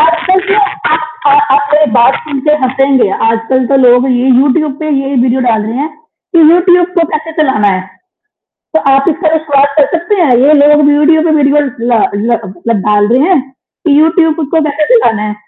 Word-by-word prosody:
आजकल 330 +4 +1
की 390 +1 -2
जो - - +1
अ 405 -5 -1 0.3
अ, - - +4 0.2
आप 285 0 0
मेरी 300 0 +2
बात 240 -1 +3
सुन 280 -3 -4
के 300 - +3
हँसेंगे। 265 -2 +1 0.2
आजकल 235 +3 -1
तो 275 - +1
लोग 250 -1 +3
ये 250 +1 0
यूट्यूब 290 +2 0
पे 310 - -4
ये 275 -1 -2
ही 280 - -3
वीडियो 255 +1 0
डाल 225 -4 0
रहे 225 +3 -5
हैं, 295 +3 -3 0.5
कि 335 - +4
यूट्यूब 355 0 +2
को 330 - +1
कैसे 310 +1 -4
चलाना 240 -8 0
है। 185 -1 -2 0.9
तो 320 - +2
आप 275 0 +2
इसका 320 0 -2
विश्वास 285 -3 0
कर 290 - +4
सकते 345 +5 -3
है, 305 - +1
ये 290 +3 +4
लोग 295 0 +3
यूट्यूब 315 +2 +2
पे 330 - 0
वीडियो 290 0 +2 0.3
ला 235 -2 +1 0.2
लब 225 +3 -2
मतलब 230 -1 -3
डाल 205 0 +2
रहे 255 +2 +2
हैं, 365 -8 +2 0.5
कि 290 -2 +3
यूट्यूब 325 0 +1
खुद 310 -4 -4
को 325 - +2
कैसे 295 +1 -2
चलाना 225 - +1
है। 210 0 -4
285 Hz, 210 wpm, -10 LUFS, 255-320 Hz, 0.9 s, अ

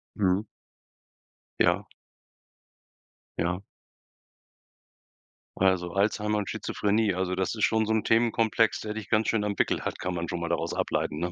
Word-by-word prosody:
Mhm. 100 +1 +1 1.1
Ja. - - +3 1.5
Ja. 90 +3 -1 2.0
Also, 90 -2 +2
Alzheimer 105 +2 +1
und 100 - -4
Schizophrenie 105 -1 0
also, 90 0 -1
das 95 +3 -1
ist 110 - -3
schon 110 -1 +3
so 110 - 0
'n 110 - +1
Themenkomplex, 115 -1 +2
der 105 0 -5
dich 110 -3 -6
ganz 110 -1 +2
schön 110 -2 +1
am 105 -1 -2
Wickel - - +1
hat, - - -3
kann 90 0 -3
man 85 -1 -3
schon 90 - -3
mal 85 0 -3
daraus 85 - -1
ableiten, 75 - -1
ne? 90 +1 -2
100 Hz, 150 wpm, -27 LUFS, 90-110 Hz, 2.0 s, Ja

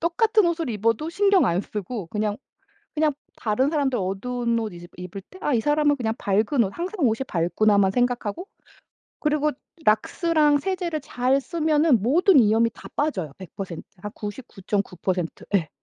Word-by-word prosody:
똑같은 410 +4 +3
옷을 330 -6 -1
입어도 230 +9 0
신경 395 -4 +4
안 175 +2 +1
쓰고 210 -1 -5
그냥 210 +2 -2 0.6
그냥 305 -1 +2 0.2
다른 230 +5 +1
사람들 285 -5 0
어두운 235 +5 -1
옷 220 -2 -4
이제 175 0 -10
입을 180 +2 -8
때 375 - -14
'아 295 - 0
이 230 - +3
사람은 295 +1 +2
그냥 225 -3 -1
밝은 215 +6 +2
옷, 195 - -3
항상 365 - -5
옷이 225 +2 +1
밝구나.'만 195 +3 +2
생각하고 245 - -1 0.7
그리고 300 0 +1 0.3
락스랑 295 - +3
세제를 345 -1 -2
잘 260 0 +1
쓰면은 310 - +2
모든 330 - +5
이염이 225 +1 +4
다 - - -12
빠져요. 195 - -1
100% 185 -2 -7 0.2
한 205 +3 -6
99.9%. 195 -5 -3
예. 170 -6 +2
245 Hz, 290 characters per minute, -24 LUFS, 205-305 Hz, 0.7 s, 모든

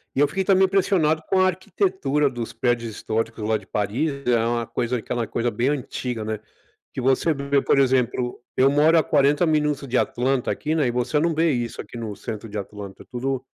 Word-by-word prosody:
E - - 0
eu 145 - +5
fiquei 190 +6 -2
também 190 0 +4
impressionado 180 -5 +2
com 190 - +3
a 185 - +5
arquitetura 180 -5 0
dos 120 -3 -5
prédios 120 -2 0
históricos 110 +1 -3
lá 110 - +2
de 100 -2 -15
Paris, 140 +8 -2
é 120 -1 +4
uma 120 0 0
coisa 120 +2 -2
aquela 120 0 -3
coisa 120 +1 -1
bem 120 +5 0
antiga, 125 -4 -3
né? 110 -1 -3 0.5
Que - - -4
você 135 +6 +2
vê, 140 -1 0
por - - +2
exemplo, 125 -2 +1
eu 135 +1 +5
moro 155 +3 +5
a - - +4
40 145 +3 +3
minutos 150 -3 +1
de 125 - 0
Atlanta 130 0 0
aqui, 155 +1 -1
né, 150 -5 +2
e - - +1
você 125 +4 0
não 165 0 +1
vê 165 +1 +2
isso 120 -2 -3
aqui - - -10
no 110 -3 -5
centro 110 0 -6
de 105 - -5
Atlanta, 100 -1 -8
tudo 130 +1 -2
130 Hz, 210 wpm, -23 LUFS, 120-150 Hz, 0.5 s, eu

